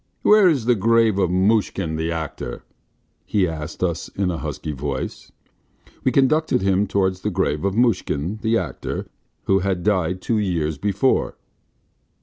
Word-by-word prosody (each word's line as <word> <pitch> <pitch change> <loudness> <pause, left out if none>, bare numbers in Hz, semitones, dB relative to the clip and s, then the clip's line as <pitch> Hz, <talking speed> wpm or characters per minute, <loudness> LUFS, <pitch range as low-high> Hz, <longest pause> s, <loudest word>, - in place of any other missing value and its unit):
"Where 210 -3 +6
is 135 -9 0
the 125 - +4
grave 115 -1 +3
of 90 -3 +2
Mushkin, 95 -3 +1
the 80 +1 -2
actor?" 80 -6 -5 0.6
he 95 -3 +1
asked 80 +1 -6
us 85 -3 -1
in 95 -2 -1
a 85 - -4
husky 75 - -5
voice. 70 -1 -5 0.7
We 130 - +2
conducted 140 -1 +2
him 95 +1 +2
towards 95 -1 0
the 105 - -1
grave 75 -5 -1
of 100 0 0
Mushkin, 110 - 0
the 115 +1 +2
actor, 80 - -4 0.4
who 95 0 +2
had 95 -2 -1
died 95 -3 +1
two 110 +3 0
years 80 -7 -1
before. 105 +6 +1
95 Hz, 150 wpm, -22 LUFS, 85-110 Hz, 0.7 s, Where